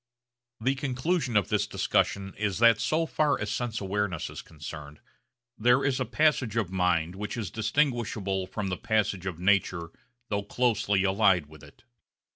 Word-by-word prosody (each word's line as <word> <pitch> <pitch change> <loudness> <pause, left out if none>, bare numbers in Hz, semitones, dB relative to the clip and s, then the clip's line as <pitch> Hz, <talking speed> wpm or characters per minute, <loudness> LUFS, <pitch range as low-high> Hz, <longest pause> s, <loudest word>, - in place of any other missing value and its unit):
The 130 +4 +1
conclusion 135 -1 -1
of 100 - +1
this - - +1
discussion 100 -1 0
is 105 -3 -1
that 115 -1 +5
so 160 +7 +1
far 150 -3 +1
as 105 0 -3
sense 115 -1 -2
awareness 100 -3 -2
is - - -7
concerned 75 -2 -10 0.6
there 125 +4 +4
is 135 -2 +1
a 130 - 0
passage 130 -3 +1
of 105 -6 0
mind 90 -2 +1
which 105 +4 -5
is 105 -7 -4
distinguishable 110 -6 0
from 100 0 -4
the 90 - -2
passage 105 -4 0
of 90 -4 -4
nature 90 -2 +1 0.4
though 100 -1 0
closely 105 -3 +1
allied 95 -4 +3
with 75 0 -16
it. 75 - -17
105 Hz, 160 wpm, -28 LUFS, 95-120 Hz, 0.6 s, that